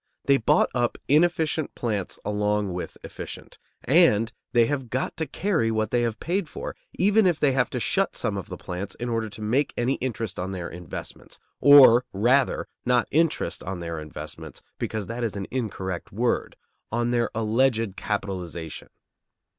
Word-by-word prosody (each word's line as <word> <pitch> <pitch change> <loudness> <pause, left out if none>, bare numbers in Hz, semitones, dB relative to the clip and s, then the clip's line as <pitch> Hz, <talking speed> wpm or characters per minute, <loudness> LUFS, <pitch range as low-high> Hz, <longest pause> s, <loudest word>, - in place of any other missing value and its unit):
They 140 -1 +5
bought 115 - +3
up 120 -1 0
inefficient 160 0 +2
plants 105 -6 -2
along 105 -1 0
with 90 - -5
efficient, - - -9 0.2
and 120 -8 +4 0.2
they 120 -2 +5
have 135 -2 -2
got 130 +3 -2
to 160 - -2
carry 175 - 0
what 110 -1 0
they 120 - +2
have 115 -2 -1
paid 175 -1 -1
for, - - -6 0.2
even 205 +2 +4
if 175 -4 +1
they 145 - +4
have 130 -3 +1
to - - -3
shut - - 0
some - - -1
of - - -5
the - - -6
plants 95 +2 -6
up - - -17
in 120 - -2
order 115 -1 -1
to 110 - -10
make 130 +7 +1
any 125 +3 +1
interest 115 -7 -3
on 95 +2 -3
their 90 -2 -4
investments; 85 -2 -8 0.2
or, 135 -4 +8
rather, 125 +7 +2 0.2
not 125 -1 +2
interest 165 +1 +1
on 95 -1 -5
their 85 -1 -4
investments, 75 -1 -8 0.2
because 110 -2 -3
that 115 +5 -4
is 110 -3 -2
an 100 -1 -3
incorrect 95 -8 -4
word, 120 +4 -1 0.4
on 120 +1 0
their 120 -1 +1
alleged 115 -1 +1
capitalization. 95 -5 -4
115 Hz, 170 wpm, -25 LUFS, 100-135 Hz, 0.4 s, or